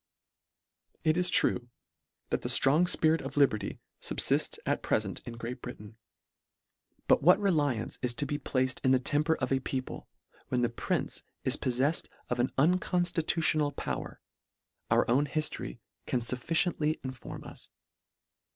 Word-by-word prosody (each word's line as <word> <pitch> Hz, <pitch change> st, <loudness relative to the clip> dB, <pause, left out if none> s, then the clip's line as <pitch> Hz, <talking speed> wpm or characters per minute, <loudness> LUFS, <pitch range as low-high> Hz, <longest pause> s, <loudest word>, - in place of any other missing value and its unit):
It 155 Hz, -1 st, +3 dB
is 180 Hz, 0 st, +3 dB
true, 125 Hz, -8 st, +2 dB, 0.6 s
that -, -, 0 dB
a -, -, -2 dB
ftrong 150 Hz, +6 st, +4 dB
fpirit 160 Hz, -2 st, +2 dB
of -, -, -7 dB
liberty 135 Hz, -7 st, +2 dB, 0.2 s
fublifts -, -, +1 dB
at -, -, 0 dB
prefent -, -, -1 dB
in 120 Hz, -, -5 dB
Great 120 Hz, +1 st, -6 dB
Britain, 110 Hz, -3 st, -9 dB, 1.1 s
but -, -, +5 dB
what 180 Hz, +6 st, +6 dB
reliance 145 Hz, -, 0 dB
is 120 Hz, -1 st, 0 dB
to 145 Hz, -, 0 dB
be 145 Hz, +1 st, -3 dB
placed 130 Hz, -1 st, -1 dB
in 130 Hz, -, +4 dB
the 130 Hz, -, +4 dB
temper 150 Hz, +4 st, +1 dB
of 130 Hz, -3 st, -3 dB
a 135 Hz, -, +3 dB
people, 130 Hz, 0 st, -5 dB, 0.4 s
when 125 Hz, -1 st, 0 dB
the 120 Hz, -, +2 dB
prince 115 Hz, -, -1 dB, 0.2 s
is -, -, +3 dB
pofleffed 130 Hz, +6 st, 0 dB, 0.2 s
of 125 Hz, -, -1 dB
an 120 Hz, -, +1 dB
un 170 Hz, +7 st, +4 dB
conftitutional 165 Hz, -4 st, +1 dB
power, -, -, -4 dB, 0.7 s
our -, -, +3 dB
own 135 Hz, +5 st, +3 dB
hiftory 150 Hz, -, -3 dB, 0.3 s
can 125 Hz, -, 0 dB
fuf 125 Hz, +2 st, 0 dB
ficiently 160 Hz, -2 st, +1 dB
inform 130 Hz, -1 st, -7 dB
us. -, -, -8 dB
140 Hz, 150 wpm, -30 LUFS, 125-160 Hz, 1.1 s, what